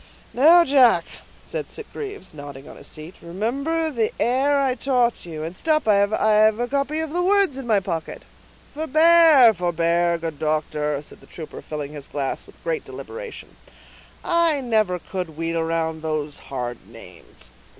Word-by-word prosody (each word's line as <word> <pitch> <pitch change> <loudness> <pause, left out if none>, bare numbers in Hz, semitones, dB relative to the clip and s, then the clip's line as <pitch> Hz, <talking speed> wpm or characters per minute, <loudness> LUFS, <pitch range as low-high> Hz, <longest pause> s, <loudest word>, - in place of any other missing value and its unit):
"Now, 335 +6 +6
Jack," 250 - +5 0.4
said - - -5
Sitgreaves, 410 - -8
nodding 145 -2 -10
on - - -11
his - - -11
seat, 155 +3 -9
"remember 275 - -2
the 230 -5 0
air 270 +4 +2
I 270 -2 +1
taught 245 -5 0
you, 155 -2 -6
and—stop, 265 - -1
I 215 - +5
have 215 +1 +3
a 245 - -1
copy 280 +4 -1
of 320 -1 -5
the 355 - 0
words 390 -4 +3
in 270 -2 -7
my 215 -3 +3
pocket." 170 -5 -5 0.5
"Forbear, 315 -4 +6
forbear, 170 -1 +1
good 165 -3 -6
doctor," 150 -1 -1
said - - -14
the - - -19
trooper, 160 -3 -9
filling 150 -1 -6
his 145 -2 -9
glass 140 -2 -4
with - - -20
great - - -2
deliberation; 475 -1 -9 0.7
"I 335 -3 +2
never 215 -8 +1
could 180 -3 -6
wheel 165 0 -1
round 160 -1 -2
those 155 -2 -3
hard 120 -6 -5
names. 90 - -13
210 Hz, 155 wpm, -22 LUFS, -, 0.7 s, Now